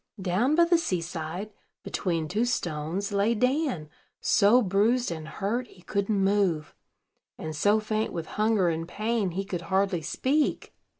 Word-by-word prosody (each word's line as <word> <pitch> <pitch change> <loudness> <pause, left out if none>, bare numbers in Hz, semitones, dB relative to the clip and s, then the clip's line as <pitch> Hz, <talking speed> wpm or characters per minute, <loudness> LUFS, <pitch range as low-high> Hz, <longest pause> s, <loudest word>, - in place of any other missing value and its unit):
Down 195 +10 +1
by 340 +1 +6
the 340 0 +4
sea 185 - -1
side, 170 +4 -5 0.3
between 165 -4 -2
two 210 +8 0
stones, 175 -3 -2
lay 205 +3 +2
Dan, 250 - 0 0.3
so 220 +5 +4
bruised 215 +4 +2
and 160 -2 -6
hurt 225 +9 -2
he 180 -4 -19
couldn't 200 +1 0
move, 190 -6 +1 0.6
and 155 -1 -5
so 205 +7 +3
faint 215 0 -1
with 165 -2 -4
hunger 215 -2 +1
and 165 0 -2
pain 215 +1 -1
he 190 +3 -3
could 180 -3 -4
hardly 190 0 0
speak. 280 - 0
200 Hz, 155 wpm, -27 LUFS, 170-225 Hz, 0.6 s, by